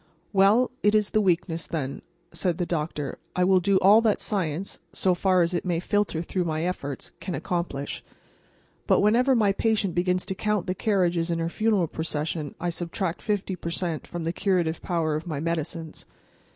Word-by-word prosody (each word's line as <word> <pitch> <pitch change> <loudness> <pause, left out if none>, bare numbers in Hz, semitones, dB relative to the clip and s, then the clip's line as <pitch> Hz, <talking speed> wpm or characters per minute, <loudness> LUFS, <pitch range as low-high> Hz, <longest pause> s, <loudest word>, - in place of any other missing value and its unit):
"Well, 205 +6 +4
it 210 +1 +3
is 210 -1 +2
the 215 - +3
weakness, 175 -3 0
then," 140 -5 -3 0.3
said 175 -3 -1
the 175 - -1
doctor. 150 -4 -3 0.2
"I 180 - +2
will 185 0 +5
do 195 +2 +3
all 205 +4 +7
that 220 -3 +2
science, 185 -2 -2
so 185 - +2
far 185 0 +3
as 170 +2 -1
it 175 - -1
may 175 -3 0
filter 190 -3 0
through 180 +1 -1
my 155 -1 -1
efforts, 145 -7 -4
can 185 -3 -4
accomplish. 170 -6 -3 0.8
But - - +4
whenever 245 +6 +4
my 210 -4 +3
patient 205 -2 0
begins 180 +1 +1
to - - -2
count 210 0 -1
the 185 - -1
carriages 180 -4 +1
in 170 - 0
her 165 0 -1
funeral 215 -1 +1
procession 155 -1 -3
I 175 0 -1
subtract 170 +1 -3
50 200 -3 -1
per 170 - -5
cent. 170 -2 -2
from 175 -1 -5
the 165 +1 -1
curative 180 -4 0
power 165 -3 0
of 155 +3 -3
medicines. 160 +1 -4
175 Hz, 180 wpm, -26 LUFS, 165-195 Hz, 0.8 s, all